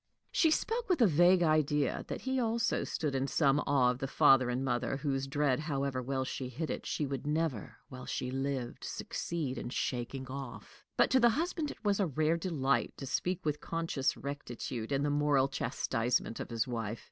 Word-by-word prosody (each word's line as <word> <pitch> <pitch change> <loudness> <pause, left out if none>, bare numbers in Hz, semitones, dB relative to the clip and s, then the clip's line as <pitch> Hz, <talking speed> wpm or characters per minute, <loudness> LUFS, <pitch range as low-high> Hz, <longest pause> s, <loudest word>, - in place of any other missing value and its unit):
She 325 - +4
spoke 455 +9 0
with 360 - +3
a 235 - +7
vague 175 +1 +5
idea 150 -3 +2
that - - -5
he 260 0 -1
also 230 -1 +1
stood 150 -4 -2
in 135 0 0
some 140 -1 +3
awe 130 -3 +4
of 125 - -6
the 135 - -2
father 130 -1 +5
and 125 +2 -1
mother 125 +1 0
whose 135 -1 -1
dread, 140 -2 +1
however 140 -4 -2
well 130 +1 -2
she 130 0 -4
hid 150 +6 -4
it, - - -5
she 150 - -1
would 135 0 -4
never, 150 -7 -1
while 130 -1 -9
she 125 - -3
lived, 135 -2 -3
succeed 155 -6 -3
in - - -5
shaking 125 +1 -3
off. 130 -1 -8
But - - +4
to 265 - +5
the 240 -1 +6
husband 315 +4 -1
it - - -10
was 205 0 +2
a 195 - +2
rare 155 +2 +1
delight 145 -6 0
to 135 - -6
speak 180 +7 -2
with 150 -1 -1
conscious 165 -5 -1
rectitude 125 -4 -5
in 140 0 +1
the 145 - +1
moral 145 -2 +3
chastisement 115 -3 -1
of - - -5
his 115 0 -1
wife. 115 -2 -3
140 Hz, 195 wpm, -32 LUFS, 130-165 Hz, -, a